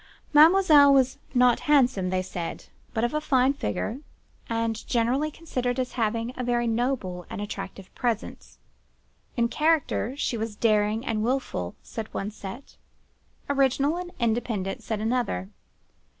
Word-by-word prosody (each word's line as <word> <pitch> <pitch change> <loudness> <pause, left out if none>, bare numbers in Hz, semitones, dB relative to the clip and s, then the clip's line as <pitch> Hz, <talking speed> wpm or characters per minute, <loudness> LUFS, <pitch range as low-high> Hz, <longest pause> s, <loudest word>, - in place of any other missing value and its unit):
Mademoiselle 305 -2 +7
was 270 0 +3 0.2
not 250 -1 +5
handsome, 250 -10 +3
they 185 0 0
said; 175 -2 -6 0.3
but 225 - -1
of 240 - 0
a 305 - 0
fine 265 -2 +3
figure, 265 -3 -3 0.5
and 230 -1 -2
generally 250 +6 +1
considered 255 -6 -3
as 255 -1 -2
having 230 +1 -1
a 255 - -4
very 240 -1 +1
noble 230 -6 -1
and - - -6
attractive 195 -2 -7
presence. 235 -4 -3 0.8
In 235 0 +3
character 295 -2 +1
she 245 - -1
was 220 -1 -4
daring 215 +1 +1
and 220 -4 -1
wilful 235 - -2
(said 220 -1 -7
one 200 +2 -3
set); 210 +5 -9 0.7
original 275 +2 +2
and 355 0 -5
independent 220 -5 -1
(said 220 -2 -3
another). 220 - -1
240 Hz, 135 wpm, -26 LUFS, 215-270 Hz, 0.8 s, Mademoiselle